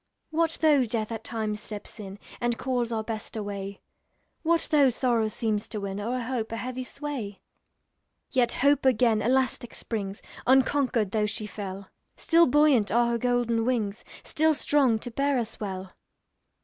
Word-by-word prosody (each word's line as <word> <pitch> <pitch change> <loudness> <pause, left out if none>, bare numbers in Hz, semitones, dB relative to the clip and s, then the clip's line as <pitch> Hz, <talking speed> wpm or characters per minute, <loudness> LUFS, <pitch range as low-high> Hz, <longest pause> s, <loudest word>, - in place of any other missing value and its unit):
What 325 0 +1
though 300 -4 +5
Death 220 -1 -2
at 225 -1 -5
times 215 -2 -3
steps 210 +1 -9
in, 195 -1 -7 0.2
And 240 -1 0
calls 245 -2 -1
our 220 -1 -1
Best 220 0 -5
away? 200 -1 -5 0.6
What 335 0 +1
though 285 -3 +6
sorrow 235 -2 +1
seems 215 -2 -2
to 215 - -4
win, 200 0 -4
O'er 245 +4 -2
hope, 235 -2 -3
a 230 - -3
heavy 255 +1 -4
sway? 250 -8 -5 0.9
Yet 245 -3 +2
Hope 285 0 +4
again 235 -4 +3
elastic 255 +1 0
springs, 200 -3 -4 0.2
Unconquered, 260 -5 +3
though 210 -1 +1
she 210 0 -3
fell; 195 -2 -7 0.3
Still 335 0 +4
buoyant 275 -5 +4
are 235 +2 +3
her 235 - 0
golden 240 -1 +1
wings, 225 -4 -1 0.2
Still 315 0 +2
strong 275 -6 +3
to 245 +2 -7
bear 275 +3 +1
us 225 -2 -4
well. 190 -2 -5
235 Hz, 160 wpm, -27 LUFS, 215-260 Hz, 0.9 s, though